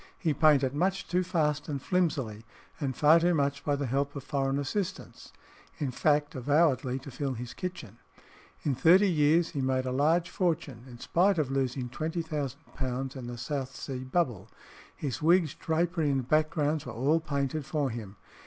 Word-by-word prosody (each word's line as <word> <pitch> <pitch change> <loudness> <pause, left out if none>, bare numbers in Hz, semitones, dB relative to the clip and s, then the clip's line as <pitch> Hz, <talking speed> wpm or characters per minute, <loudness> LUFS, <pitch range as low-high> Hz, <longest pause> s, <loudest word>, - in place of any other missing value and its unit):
He 160 -4 0
painted 140 -3 +4
much 190 +5 0
too 180 +2 +1
fast 155 -5 0
and 140 -2 -2
flimsily, 135 - -1 0.4
and 135 -4 -2
far 155 +3 +6
too 175 +1 +2
much 140 -1 0
by 145 - +1
the 140 0 -2
help 140 +3 -1
of 140 - -5
foreign 135 -1 -1
assistants 170 +7 -4 0.5
in 140 -4 -2
fact, 145 +2 +1
avowedly 135 -1 +2
to 135 +1 -9
fill 135 +1 -3
his 120 +1 -7
kitchen. 180 - -7 0.6
In 145 - +1
thirty 170 +10 +5
years 160 0 +3
he 145 - -3
made 130 0 0
a 130 - -2
large 160 +6 +2
fortune, 145 - -2
in 120 -2 -11
spite 180 +9 +2
of 145 -4 0
losing 130 -2 -1
£20,000 140 -3 -4
in 125 -2 -7
the 120 0 -6
South 135 +1 -4
Sea 130 -2 -5
Bubble. 130 - -1 0.5
His 140 -5 -4
wigs, 165 -1 +4
drapery, 165 -1 0
and 135 -3 0
backgrounds 155 0 +1
were 120 - -6
all 140 +8 +2
painted 145 -1 -2
for 145 -2 -1
him. 110 -4 -7
145 Hz, 170 wpm, -29 LUFS, 130-160 Hz, 0.6 s, far